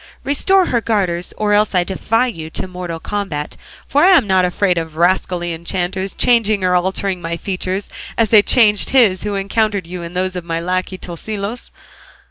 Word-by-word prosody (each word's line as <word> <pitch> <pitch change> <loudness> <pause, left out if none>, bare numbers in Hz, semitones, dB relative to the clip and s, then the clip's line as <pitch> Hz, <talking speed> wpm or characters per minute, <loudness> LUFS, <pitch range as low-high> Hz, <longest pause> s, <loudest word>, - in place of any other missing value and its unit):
Restore 370 +7 +2
her 240 -7 0
garters, 185 -6 -1
or 210 -1 +1
else 210 -1 +2
I 180 - +3
defy 215 +6 0
you 165 -10 -6
to 190 - -4
mortal 180 -2 -6
combat, 185 -7 -4 0.3
for 290 +2 +2
I 370 0 +7
am 250 - +2
not 190 -2 +3
afraid 180 0 +1
of 160 -1 -7
rascally 175 0 0
enchanters 185 +3 -3
changing 220 -5 +2
or 180 0 +2
altering 185 +1 -1
my 170 0 -3
features 190 +1 -3 0.3
as 225 -2 +2
they 215 -2 +7
changed 210 -2 +3
his 220 -9 +4
who 205 -1 -3
encountered 200 -1 0
you 180 +1 -7
into 170 +1 -8
those 185 0 -2
of 180 - -4
my 165 -1 -3
lacquey, 185 +2 -2
Tosilos." 200 +6 -5
190 Hz, 180 wpm, -18 LUFS, 175-215 Hz, 0.3 s, I